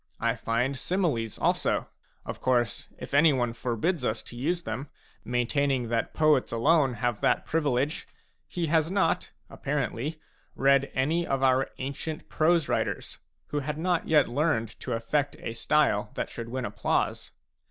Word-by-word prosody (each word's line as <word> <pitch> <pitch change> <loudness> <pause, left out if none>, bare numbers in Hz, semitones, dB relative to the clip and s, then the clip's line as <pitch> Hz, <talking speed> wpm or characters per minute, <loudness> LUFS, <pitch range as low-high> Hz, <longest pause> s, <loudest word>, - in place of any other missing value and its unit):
I - - +1
find 120 +4 0
similes 135 - -1
also; - - +1 0.4
of - - -6
course, 130 +2 0
if - - -9
anyone 140 -5 +4
forbids 125 +7 -1
us 110 -2 -1
to - - -11
use 170 +8 -1
them, 140 -2 -4 0.3
maintaining 125 +1 0
that 115 -1 -1
poets 155 -4 +3
alone 135 +2 +3
have 120 -3 -1
that - - +2
privilege, 145 -2 0 0.4
he 175 -2 -2
has 160 0 +2
not, 195 +1 +1 0.2
apparently, 145 +2 -3 0.4
read 140 0 +3
any 160 +6 +1
of 135 -1 0
our 130 0 +3
ancient 140 +4 -5
prose 160 0 +3
writers, - - -2 0.3
who 145 - -1
had 150 +2 -3
not 175 +1 0
yet 150 -3 +5
learned 125 -3 +1
to - - -7
afFect 135 +6 0
a 115 - -5
style 115 -4 +2
that - - -3
should 115 -1 -6
win 130 0 -3
applause. 100 +1 -1
135 Hz, 150 wpm, -28 LUFS, 120-155 Hz, 0.4 s, yet